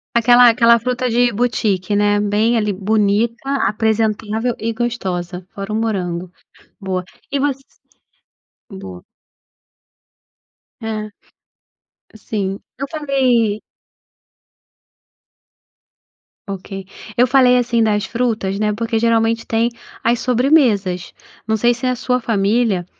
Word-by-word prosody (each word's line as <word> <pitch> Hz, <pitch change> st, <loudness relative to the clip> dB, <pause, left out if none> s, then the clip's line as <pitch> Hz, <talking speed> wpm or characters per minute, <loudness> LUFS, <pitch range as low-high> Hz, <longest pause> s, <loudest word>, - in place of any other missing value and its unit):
Aquela 240 Hz, +1 st, +6 dB
aquela 235 Hz, 0 st, +5 dB
fruta 250 Hz, +1 st, -1 dB
de 240 Hz, +1 st, +3 dB
boutique, 210 Hz, -4 st, 0 dB
né. 205 Hz, 0 st, +2 dB
Bem 210 Hz, +3 st, +1 dB
ali, 210 Hz, -2 st, 0 dB
bonita, 215 Hz, +5 st, 0 dB, 0.2 s
apresentável 220 Hz, +1 st, 0 dB
e 225 Hz, +1 st, -2 dB
gostosa. 185 Hz, -7 st, -3 dB
Fora 200 Hz, +1 st, -6 dB
o -, -, -1 dB
morango 185 Hz, -6 st, -2 dB, 0.5 s
boa. 185 Hz, -2 st, -3 dB, 0.3 s
E 280 Hz, -, -1 dB
você 275 Hz, -1 st, -1 dB, 1.2 s
Boa. 90 Hz, -, -9 dB, 1.8 s
É. 215 Hz, -1 st, -4 dB, 1.0 s
Sim. 200 Hz, -2 st, -3 dB, 0.2 s
Eu 275 Hz, -, -3 dB
falei 255 Hz, -8 st, +1 dB, 2.9 s
Ok. 195 Hz, 0 st, -6 dB, 0.3 s
Eu 245 Hz, +2 st, +4 dB
falei, 255 Hz, -1 st, +5 dB
assim, 235 Hz, -2 st, +1 dB
das 210 Hz, -1 st, +1 dB
frutas, 220 Hz, -5 st, -1 dB
né, 210 Hz, -1 st, +1 dB
porque 225 Hz, +1 st, -2 dB
geralmente 230 Hz, 0 st, +1 dB
tem 230 Hz, +1 st, +1 dB, 0.3 s
as 235 Hz, +1 st, +2 dB
sobremesas. 240 Hz, -, +2 dB, 0.3 s
Não 220 Hz, -, +2 dB
sei 240 Hz, +3 st, +3 dB
se 250 Hz, +2 st, -6 dB
a 255 Hz, 0 st, +1 dB
sua 250 Hz, +1 st, 0 dB
família 210 Hz, -3 st, +1 dB
225 Hz, 105 wpm, -18 LUFS, 205-240 Hz, 2.9 s, Aquela